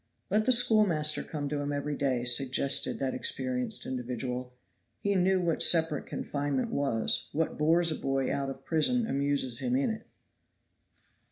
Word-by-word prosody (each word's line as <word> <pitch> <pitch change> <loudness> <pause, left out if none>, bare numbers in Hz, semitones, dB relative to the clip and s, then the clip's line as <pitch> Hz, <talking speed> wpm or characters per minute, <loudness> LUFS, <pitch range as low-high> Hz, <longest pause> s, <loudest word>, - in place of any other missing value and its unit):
"Let 215 +2 +2
the 255 - +3
schoolmaster 210 -11 +4
come 145 -2 -5
to 145 0 -2
him 145 0 -3
every 145 +1 -3
day," 130 -4 -1
suggested 130 +2 +2
that 135 -1 -2
experienced 130 -1 -2
individual. 125 0 -5 0.5
He 200 - 0
knew 190 0 +2
what 170 -3 0
separate 160 -4 +3
confinement 140 -2 -3
was. 135 -6 0
What 160 0 -2
bores 165 +2 +3
a - - -2
boy 135 -2 -1
out 140 -1 -2
of 135 - -9
prison 230 +10 +1
amuses 140 - -1
him 125 -2 -1
in 140 - +1
it. 220 - -8
145 Hz, 155 wpm, -29 LUFS, 130-165 Hz, 0.5 s, schoolmaster